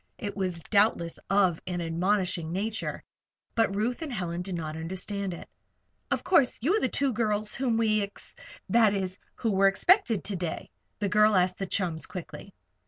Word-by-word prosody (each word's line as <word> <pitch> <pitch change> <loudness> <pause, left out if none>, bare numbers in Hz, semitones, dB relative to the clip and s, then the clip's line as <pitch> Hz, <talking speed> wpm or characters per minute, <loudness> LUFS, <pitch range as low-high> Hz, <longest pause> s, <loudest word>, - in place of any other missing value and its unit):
It 205 -1 -5
was 180 -4 -2
doubtless 200 -5 +2
of 190 -4 +3
an 180 -1 -2
admonishing 175 0 0
nature, 210 +5 -3 0.5
but 225 -4 +2
Ruth 235 +8 -1
and 315 -3 -4
Helen 175 -6 -3
did 185 0 -4
not 155 -2 -4
understand 190 +4 -4
it. 170 - -8 0.6
"Of - - 0
course, 290 -9 +3
you 290 - +1
are - - +3
the 260 - 0
two 275 -2 0
girls 215 -1 0
whom 245 -3 0
we 215 -2 +2
ex 200 0 -7 0.3
that 220 -3 +4
is, 185 -1 -3 0.2
who 225 - -1
were 195 0 +4
expected 230 - +3
to 200 - -3
day?" 175 -2 -4 0.3
the 205 - -1
girl 210 +2 +4
asked 180 0 +2
the 195 - -2
chums, 175 -4 -1
quickly. 185 +2 -8
200 Hz, 175 wpm, -28 LUFS, 180-220 Hz, 0.6 s, that